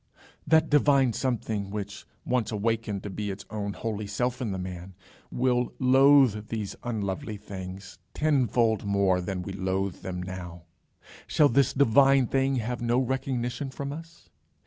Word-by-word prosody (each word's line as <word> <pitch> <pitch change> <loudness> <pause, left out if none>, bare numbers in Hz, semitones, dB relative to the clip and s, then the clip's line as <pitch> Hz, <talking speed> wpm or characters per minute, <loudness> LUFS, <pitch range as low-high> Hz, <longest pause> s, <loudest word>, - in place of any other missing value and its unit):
Shall - - -28 0.3
that 160 0 +4
divine 140 -4 +4
something, 110 -6 -2
which, 100 0 -6 0.2
once 125 -3 0
awakened 110 -1 -1
to 105 - -5
be 105 +1 -4
its 95 +1 -6
own 100 -2 -3
holy 110 -1 -4
self 125 +5 -2
in 115 -5 -2
the 95 - -3
man, 90 0 -7 0.4
will 125 -1 0
loathe 130 -4 +5
these 110 -3 -4
unlovely 105 -2 -3
things 95 -1 -9 0.2
tenfold 125 -7 +2
more 100 -2 +2
than 90 0 -4
we - - -6
loathe 95 0 -2
them 90 -1 -5
now 90 -2 -7 0.6
shall 150 -2 +4
this 140 +2 +3
divine 135 0 +5
thing 135 +2 +1
have 120 0 -3
no 120 +1 +1
recognition 130 0 -2
from 140 +1 -5
us? 165 - -11
115 Hz, 150 wpm, -27 LUFS, 100-130 Hz, 0.6 s, loathe